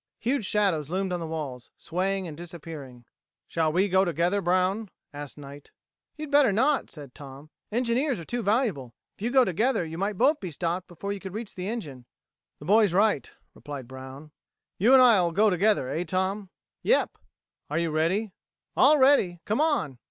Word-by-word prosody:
Huge 235 -2 -1
shadows 185 -9 +1
loomed 190 +1 -1
on 175 - -2
the 165 - -5
walls, 145 -6 -6
swaying 190 +2 -2
and 155 - -7
disappearing. 155 -7 -9 0.4
"Shall 160 -1 0
we 185 +5 +2
go 190 0 +3
together, 175 +3 0
Brown!" 185 +4 +1 0.2
asked 145 0 -8
Knight. 145 0 -11 0.5
"You'd 305 -1 -7
better 285 -5 +5
not," 265 +8 +1
said 145 -5 -11
Tom. 140 +2 -12 0.2
"Engineers 245 - 0
are 165 - -8
too 240 +6 -3
valuable. 200 - 0 0.2
If - - -25
you 230 - 0
go 260 0 +5
together 205 +2 0
you 165 +1 -7
might 200 0 -2
both 285 +7 +3
be 185 - -5
stopped 170 +3 -3
before 200 +3 -5
you 200 - -6
could 190 0 -8
reach 220 -1 -6
the 185 0 -5
engine." 145 - -6 0.5
"The - - -12
boy's 210 -1 +4
right," 200 -6 +2 0.2
replied 140 -4 -8
Brown. 130 +3 -10 0.5
"You 230 +8 +5
and 260 -1 +8
I'll 195 -9 +5
go 210 +5 +3
together, 190 -5 +2
eh, 165 - -2
Tom?" 190 +3 -2 0.3
"Yep." - - +2 0.5
"Are 150 - -2
you 165 -1 0
ready?" 180 +7 0 0.4
"All 305 - +6
ready. 260 -11 +4
Come 215 +7 0
on." 290 - 0
185 Hz, 180 wpm, -26 LUFS, 155-215 Hz, 0.5 s, and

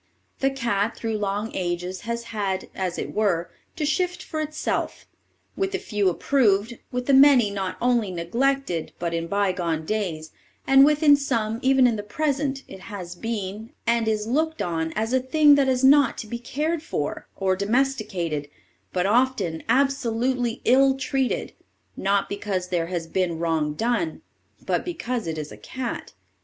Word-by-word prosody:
The 270 - +3
cat 235 -5 -1
through 225 -2 -2
long 205 +2 -2
ages 180 +1 -3
has 235 0 -2
had, 195 -3 -2
as 185 -2 -3
it - - -4
were, 185 -6 0 0.2
to 305 - -1
shift 355 +3 0
for 310 -2 -4
itself; 310 0 -3 0.5
with 390 0 -1
the - - +1
few 210 - 0
approved, 220 +1 +1
with 250 -1 -2
the 275 - +2
many 265 -6 +7
not 190 -2 -3
only 240 -4 +2
neglected, 185 +1 -1
but 170 -1 -3
in 165 0 -2
bygone 180 -5 0
days, 165 -6 -3 0.3
and 270 0 +7
with 300 +2 +3
some 230 -5 -1
even 265 0 +4
in 235 -3 +3
the - - -3
present, 275 +4 -1
it 190 - -10
has 185 -3 -7
been, 215 +3 -5
and 235 -1 +2
is 215 -1 0
looked 315 +7 0
on 160 -2 -1
as 220 +3 -1
a 260 - +4
thing 295 +3 +5
that 280 -2 +4
is 255 0 +1
not 280 +1 +5
to - - -5
be 235 +2 -5
cared 300 +6 -2
for, 150 - -4
or 190 -1 +1
domesticated, 200 - -1 0.4
but 180 0 0
often 205 -7 +1
absolutely 250 -3 +1
ill 270 +2 +5
treated, 265 -1 -1 0.4
not 200 0 +1
because 195 -3 -3
there 170 -2 0
has 175 -2 -3
been 170 0 -1
wrong 160 -3 0
done, 245 - -1 0.4
but - - 0
because 250 - -3
it 160 -1 -3
is 150 -1 -5
a - - -10
cat. 255 -2 -6
225 Hz, 165 wpm, -24 LUFS, 185-270 Hz, 0.5 s, many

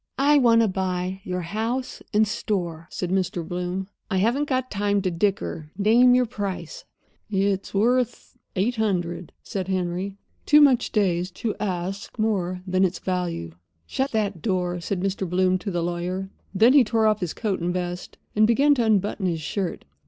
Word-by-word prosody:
"I 290 +2 +5
want 230 -3 +5
to 225 - +3
buy 185 0 -2
your 180 0 -3
house 225 +8 -3
and 215 -1 +3
store," 175 -6 -3
said 180 -1 -4
Mr. 180 -3 -1
Bloom. 180 +1 -3 0.2
"I 190 - 0
haven't 240 +9 +1
got 255 -1 -1
time 205 0 +1
to 185 - 0
dicker—name 205 +5 +2
your 250 0 +4
price." 200 -8 -5 0.4
"It's 195 -1 0
worth 240 +4 0 0.2
eight 220 +6 0
hundred," 180 -5 -1
said 190 -2 -4
Henry, 185 +1 -2 0.3
too 300 - +7
much 275 -5 +4
dazed 180 -3 0
to 220 -3 -2
ask 190 +2 -4
more 185 -5 -1
than 185 0 +1
its 185 -1 +1
value. 175 - -3 0.3
"Shut 265 - -1
that 205 -6 -1
door," 180 -4 -1
said 180 +1 -2
Mr. 190 -1 -2
Bloom 185 +1 +2
to 200 - -4
the 175 -3 -1
lawyer. 180 +3 -3 0.2
Then 225 +6 +5
he 285 -3 +7
tore 225 0 +1
off 215 -1 +3
his 180 -3 -3
coat 205 -5 -1
and 175 +1 0
vest, 180 0 -4 0.2
and 215 0 +5
began 280 +6 +4
to 250 -4 +1
unbutton 205 -2 +1
his 165 -3 -1
shirt. 185 +3 -3
195 Hz, 170 wpm, -24 LUFS, 180-220 Hz, 0.4 s, too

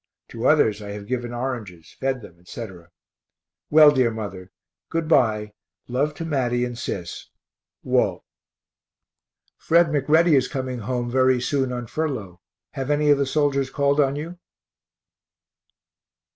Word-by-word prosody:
To 115 +2 -2
others 110 -9 +3
I 100 -1 -6
have 100 -1 -8
given 120 +1 -3
oranges, 120 -9 -6
fed 130 -2 -1
them, 85 -3 -14
etc. 90 -2 -9 0.8
Well, 155 -1 +8
dear 130 -4 +2
mother, 100 -5 -7 0.4
good 165 -1 -2
bye 110 -8 +2 0.3
love 140 +5 -1
to 165 - -5
Matty 125 -5 0
and 120 -1 -5
Sis. 95 -7 -6 0.5
WALT. - - +1 1.4
Fred 170 0 +3
McReady 155 +3 +3
is 130 -2 +3
coming 130 -3 -4
home 120 +2 -3
very 130 0 +3
soon 130 +1 -1
on 120 -1 -4
furlough 110 - -4 0.3
have 135 -1 -5
any 150 0 +3
of 145 - +4
the 140 - +1
soldiers 140 -2 +1
called 140 +1 +1
on 140 -1 +3
you? 165 +4 -6
130 Hz, 135 wpm, -23 LUFS, 110-145 Hz, 1.4 s, Well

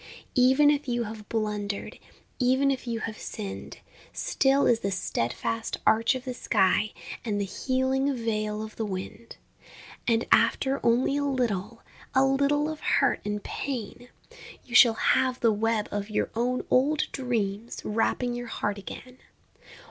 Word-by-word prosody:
Even 265 +4 +5
if 295 -1 -1
you 240 -1 0
have 215 -1 -8
blundered, 210 -2 -3 0.4
Even 260 +2 +3
if 260 -2 -4
you 230 -1 -2
have 215 -1 -5
sinned, 205 -3 -7 0.3
Still 275 +1 +2
is 235 -2 +4
the 200 - -2
steadfast 185 - -2
arch 230 +4 +4
of 255 +1 -6
the 255 - -3
sky 210 -2 +2 0.3
And 210 -3 -1
the 200 - 0
healing 260 +6 0
veil 215 -2 -2
of 215 0 -9
the 225 - -1
wind.... 200 +4 -6 0.7
And 230 -1 +2
after 265 +4 +3
only 245 +4 +2
a 290 - 0
little, 230 -6 -2 0.3
A 265 +1 +5
little 280 +2 +2
of 310 -1 -5
hurt - - +2
and 210 0 -3
pain, 245 -2 -5 0.6
You 240 - -12
shall 235 -2 +7
have 260 +2 +2
the 230 -2 +3
web 220 0 0
of 205 +1 -3
your 215 - -1
own 245 +2 -1
old 280 +4 +3
dreams 230 -4 -2
Wrapping 235 +3 0
your 240 0 -5
heart 205 -3 -2
again. 255 +6 -10
235 Hz, 150 wpm, -27 LUFS, 215-260 Hz, 0.7 s, shall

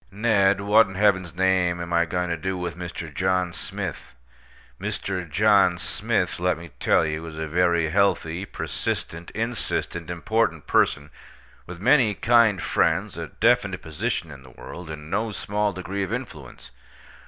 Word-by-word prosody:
Ned, 100 -1 +2
what 105 +2 +5
in 95 - -9
Heaven's 95 -4 +2
name 95 -2 +2
am 85 0 -5
I 85 0 +3
going 90 +1 -2
to - - +1
do 95 +3 -3
with 90 -1 -4
Mr. 85 -3 -7
John 90 0 0
Smith? - - -6 0.7
Mr. 90 -3 -3
John 100 0 +4
Smith, 85 - -1
let 90 +1 +1
me 85 -1 -11
tell - - +3
you, 75 +1 -3
is 80 -1 -9
a 80 - -3
very 85 0 +2
healthy, 95 -2 +1
persistent, 85 -3 -4
insistent, 110 -7 -3
important 110 +6 0
person, 75 0 +1 0.6
with 90 -1 -8
many 120 -1 +4
kind 115 -4 +4
friends, - - +1
a - - -5
definite - - +1
position 80 +1 -3
in 70 -2 -11
the 65 - -15
world, 85 +6 -10
and 75 0 -8
no 110 +2 0
small 105 +1 -1
degree 95 +2 -4
of 95 - -3
influence. 95 - -7
90 Hz, 155 wpm, -24 LUFS, 85-100 Hz, 0.7 s, what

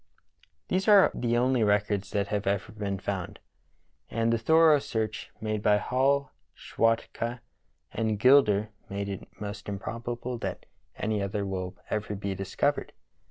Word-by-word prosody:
" - - -35
These 190 +3 0
are 205 -2 +7
the 120 -1 0
only 125 -1 +2
records 105 -1 +1
that 100 0 -1
have 105 -2 -2
ever 100 +1 0
been 100 -2 -3
found, 95 -2 -4 0.7
and 115 +1 +1
the 115 - +1
thorough 160 +4 +5
search 110 -5 -3
made 110 -1 -2
by 105 0 +4
Hall, 135 +5 +1 0.2
Schwatka, 115 +1 -1 0.5
and 110 -1 -1
Gilder 110 -4 +5 0.2
make 100 0 -3
it 95 - -6
most 105 0 -6
improbable 120 +4 -4
that - - -5 0.3
any 105 -1 -1
other 100 +1 -2
will 95 -1 -4 0.2
ever 105 -1 -2
be 100 0 -3
discovered. 95 0 -1
105 Hz, 145 wpm, -28 LUFS, 100-120 Hz, 0.7 s, are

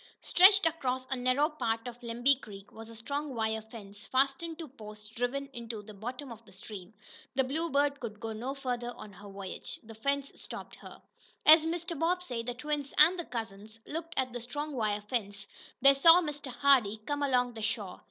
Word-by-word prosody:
Stretched 395 +2 +7
across 260 -6 0
a - - +2
narrow 255 +4 +2
part 230 -7 -2
of 245 0 -9
Lemby 240 +3 +3
Creek 200 -1 -11
was 225 0 -11
a 230 - -10
strong 280 +4 -4
wire 220 -1 -1
fence, 210 -2 -11
fastened 275 +5 +1
to 325 - -7
posts 215 -5 -11
driven 245 +5 -2
into 230 -3 -6
the 215 +1 -11
bottom 245 +6 -7
of 230 0 -10
the 205 - -18
stream. 190 0 -9 0.4
The 265 - +3
Bluebird 285 0 0
could 215 -3 -7
go 225 0 -4
no 250 +5 -4
farther 245 -3 -3
on 210 - -11
her 200 +2 -12
voyage. 195 -1 -6
The 225 0 -11
fence 280 +5 -1
stopped - - -8
her. - - -13 0.4
As 315 +1 +9
Mr. 340 -1 -2
Bobbsey, 335 -8 0
the 240 +1 -4
twins 290 +1 -3
and 340 +4 +7
the 345 - -3
cousins 220 -2 -7
looked 330 +2 -5
at 255 -2 0
the 245 - -5
strong 290 +5 -5
wire 215 -4 0
fence, 205 -2 -3 0.4
they 275 0 +9
saw 330 +5 +8
Mr. 295 -5 -4
Hardee 245 -5 +4
come 290 +1 -2
along 250 -3 +2
the 225 - -8
shore. 215 -4 -3
245 Hz, 190 wpm, -31 LUFS, 220-285 Hz, 0.4 s, As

